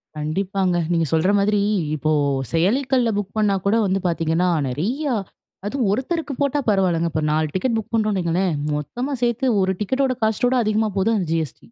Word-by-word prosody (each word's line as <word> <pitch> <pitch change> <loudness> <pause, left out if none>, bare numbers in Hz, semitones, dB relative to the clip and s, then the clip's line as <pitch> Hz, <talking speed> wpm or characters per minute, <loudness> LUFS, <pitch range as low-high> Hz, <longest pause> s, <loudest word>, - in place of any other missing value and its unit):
கண்டிப்பாங்க. 185 +4 -1 0.2
நீங்க 165 -1 +2
சொல்ற 160 +5 +3
மாதிரி, 205 +1 +2 0.4
இப்போ 155 +1 -1 0.4
செயலிக்கள்ல 245 +8 +2
புக் 205 +1 -4
பண்ணா 210 -2 +2
கூட 200 - +3
வந்து 190 +1 +1
பாத்தீங்கன்னா, 165 +1 +1 0.2
நெறையா 240 - -1 0.5
அதுவும் 240 0 -1
ஒருத்தருக்கு 280 - -2
போட்டா 285 +1 +1
பரவாயில்லங்க. 175 -5 +2
இப்போ 155 - -1
4 155 0 +1
டிக்கெட் 225 +5 0
புக் 220 +1 -6
பண்ணுறோம்னு 215 -3 +1
வையுங்களேன் 175 0 0 0.2
மொத்தமா 245 - -4
சேர்த்து 240 +2 0 0.2
ஒரு 190 0 +1
டிக்கெட்டோட 260 +5 0
காஸ்ட்டோட 245 +4 +1
அதிகமா 215 0 +1
போகுது 220 +4 +2
அந்த 180 - -2
GST. 160 -6 -2
200 Hz, 160 wpm, -21 LUFS, 170-235 Hz, 0.5 s, சொல்ற